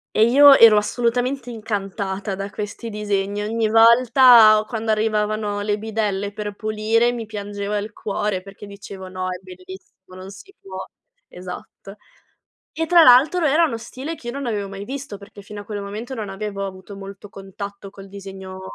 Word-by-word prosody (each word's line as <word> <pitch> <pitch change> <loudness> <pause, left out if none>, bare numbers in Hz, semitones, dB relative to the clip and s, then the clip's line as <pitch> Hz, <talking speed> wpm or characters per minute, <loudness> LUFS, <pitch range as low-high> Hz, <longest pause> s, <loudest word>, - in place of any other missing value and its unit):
E 215 - +5
io 275 +3 +7
ero 225 -2 +8
assolutamente 245 +4 -1
incantata 200 -2 -4
da 195 +1 -5
questi 210 +3 -6
disegni. 205 -1 -2
Ogni 220 +1 -1
volta 230 -1 +6
quando 225 -2 -4
arrivavano 215 -1 0
le 205 0 -1
bidelle 205 -2 -3
per 205 -1 -6
pulire 215 +2 0
mi 230 -3 -6
piangeva 205 -1 -4
il 205 +1 -5
cuore 205 -2 -3
perché 195 +2 -12
dicevo: 200 -1 -10
"No, 185 0 -5
è 180 - -4
bellissimo, 185 0 -14
non 185 +1 -10
si 200 - -14
può." 190 -1 -10 0.5
Esatto. 185 +2 -10 0.8
E 325 - -2
tra 345 0 +6
l'altro 295 +7 +5
era 310 +3 +4
uno 285 -8 -1
stile 260 +7 -7
che 255 -6 -10
io 240 - -5
non 280 -1 -5
avevo 205 -4 -3
mai 195 +1 -8
visto, 265 -4 -7
perché 200 0 -14
fino 205 0 -9
a - - -18
quel 205 -1 -6
momento 215 +6 -7
non 215 -4 -5
avevo 200 0 -5
avuto 190 +1 -10
molto 195 +1 -10
contatto 195 0 -9
col 195 0 -13
disegno 190 -1 -10
210 Hz, 170 wpm, -21 LUFS, 195-230 Hz, 0.8 s, ero